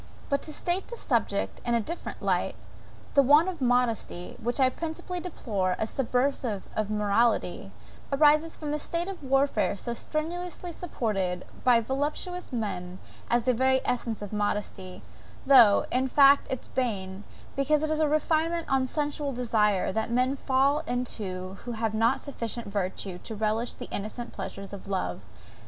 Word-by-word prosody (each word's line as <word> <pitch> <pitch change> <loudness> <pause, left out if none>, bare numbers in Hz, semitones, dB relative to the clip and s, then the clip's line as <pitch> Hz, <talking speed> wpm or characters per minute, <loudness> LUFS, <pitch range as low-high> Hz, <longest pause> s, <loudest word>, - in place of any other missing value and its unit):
But 280 0 +1
to - - -5
state 350 +5 -2
the 475 - -8
subject 225 - -1
in 240 0 +1
a - - +3
different 335 +11 -6
light. - - +1 0.6
The 280 - +7
want 295 +6 +6
of 345 -6 -7
modesty, 245 -7 0
which 240 +4 -1
I 260 - +6
principally 330 +6 -4
deplore 205 - -2
as 220 - -2
subversive 250 -4 0
of 215 -1 -1
morality, 210 - +1 0.4
arises 300 +3 +4
from 300 -2 -5
the 300 - -1
state 340 +4 -3
of 390 -2 -6
warfare 270 -5 +2
so 235 - -4
strenuously 345 +6 -4
supported 200 - -2 0.2
by 240 -2 +5
voluptuous 295 +9 -3
men 185 -6 -3 0.3
as 240 0 +3
the 255 - +3
very 260 +2 +3
essence 230 -4 -2
of 205 - -7
modesty, 205 -3 -3 0.4
though, 245 -7 +7
in 260 +1 +2
fact, 280 +1 +6
its 260 - -4
bane; 200 -6 -2 0.3
because 295 +2 +2
it 310 - 0
is 310 - 0
a 310 - +3
refinement 320 +2 +1
on 265 -1 +2
sensual 290 0 -1
desire, 215 -5 +2
that 220 +3 -1
men 255 +3 +2
fall 275 +2 +2
into 195 -7 -3
who 240 - -3
have 225 -1 -1
not 225 +2 +3
sufficient 235 -4 -5
virtue 195 -2 -3
to 220 - -7
relish 220 +3 0
the - - -8
innocent 215 +4 -4
pleasures 195 0 -7
of 200 0 -8
love. 140 - -2
245 Hz, 160 wpm, -28 LUFS, 210-290 Hz, 0.6 s, The